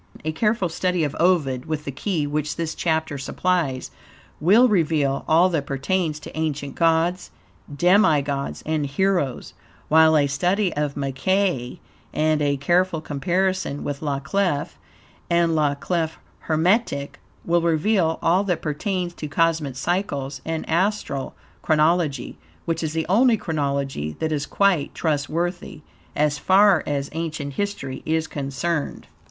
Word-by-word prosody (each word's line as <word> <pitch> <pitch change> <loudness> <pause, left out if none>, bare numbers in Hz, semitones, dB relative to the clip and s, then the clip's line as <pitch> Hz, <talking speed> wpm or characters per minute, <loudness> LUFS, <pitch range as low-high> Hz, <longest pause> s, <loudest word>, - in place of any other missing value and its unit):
A 155 - 0
careful 210 +3 +1
study 180 +1 -1
of 145 -1 -2
Ovid, 150 -8 +2
with 155 -1 -3
the 140 - -3
key 160 +2 -2
which 150 +1 -2
this 165 -1 -3
chapter 160 -3 -1
supplies, 140 -2 -1 0.5
will 210 +11 +5
reveal 155 - +1
ALL 165 +3 +5
that 155 -6 -2
pertains 155 +3 -1
to - - -10
ancient 150 -3 -2
gods, 170 +2 +1 0.4
demi 175 -1 +4
gods, 140 -1 -4
and 155 -2 -1
heroes, 160 -3 -1 0.4
while 160 0 +6
a 145 - +4
study 180 +7 0
of 145 -1 -2
Mackey, 140 0 -1 0.3
and 155 0 +1
a 145 -1 +1
careful 175 +4 +1
comparison 175 +2 -1
with 145 0 -4
"La 145 -3 -1
Clef" 155 0 -1 0.5
and 170 -1 +3
"La 150 -2 +2
Clef 160 +1 -2 0.3
Hermetique" 160 -2 +1 0.3
will 170 0 +2
reveal 165 +1 +2
all 180 +4 +3
that 180 -4 -2
pertains 175 +3 -2
to 155 - -6
cosmic 160 -3 0
cycles 140 -4 -2
and 160 0 -4
astral 170 -5 -1 0.3
chronology, 155 -4 +1 0.3
which 165 -1 -1
is 155 -1 -2
the 160 -1 -1
only 225 +5 +4
chronology 140 - -2
that 160 - -2
is 150 -1 -2
quite 195 -7 +1
trustworthy, 165 +2 -2 0.3
as 150 0 +1
far 195 -2 +5
as 140 -1 -2
ancient 155 -3 -4
history 200 -8 -4
is 160 0 0
concerned. 145 +2 -3
160 Hz, 135 wpm, -23 LUFS, 145-180 Hz, 0.5 s, while